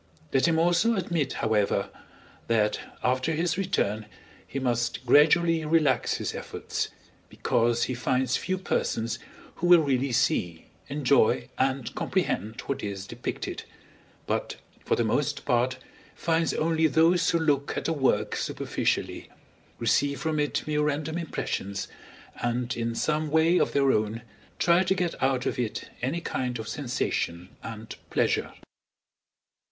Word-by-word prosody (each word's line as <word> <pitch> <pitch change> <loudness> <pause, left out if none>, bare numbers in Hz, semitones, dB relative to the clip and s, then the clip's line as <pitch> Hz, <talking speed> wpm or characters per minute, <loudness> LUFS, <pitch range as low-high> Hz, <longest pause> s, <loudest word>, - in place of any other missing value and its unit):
Let 135 +4 +4
him 165 -1 +2
also 175 +7 +3
admit, 170 -6 -1
however, 105 -3 +1 0.6
that 110 -2 +2 0.2
after 130 +5 +1
his 165 +1 0
return 110 - -1 0.4
he - - -6
must 120 -1 -1
gradually 160 +5 +5
relax 150 -5 +2
his - - -3
efforts, - - -4 0.4
because 120 0 +1
he 130 - -1
finds 125 +1 0
few 185 +1 -1
persons 115 - -1 0.4
who 175 - 0
will 175 -2 +8
really 135 -2 0
see, 90 -9 0 0.2
enjoy, 140 -4 +2
and 130 -2 0
comprehend 110 +5 -1
what 140 - -3
is 100 -1 -4
depicted, - - -5 0.6
but, - - -2 0.3
for - - +1
the - - +1
most - - 0
part, 125 +1 +1 0.4
finds 165 -1 +1
only 160 0 +2
those 165 +2 +4
who 170 - +3
look 145 -4 0
at - - -2
a 165 - +1
work 135 -4 +1
superficially, - - -2 0.5
receive 140 +4 +1
from 160 -2 -1
it 145 -1 -1
mere 150 -1 0
random 150 +2 -1
impressions, 100 - -3 0.5
and 120 +1 -1
in 115 0 -2
some 155 +4 0
way 160 +3 +4
of - - +1
their 140 -1 +4
own 110 +1 -1 0.3
try 170 +1 +4
to 190 +1 +1
get 175 -2 -2
out 130 -1 +1
of - - -1
it 115 -3 -3
any 140 +7 -1
kind 125 -5 -2
of 110 -1 -6
sensation 95 -10 -2
and 110 -1 -8
pleasure. - - +1
135 Hz, 140 wpm, -27 LUFS, 120-160 Hz, 0.6 s, will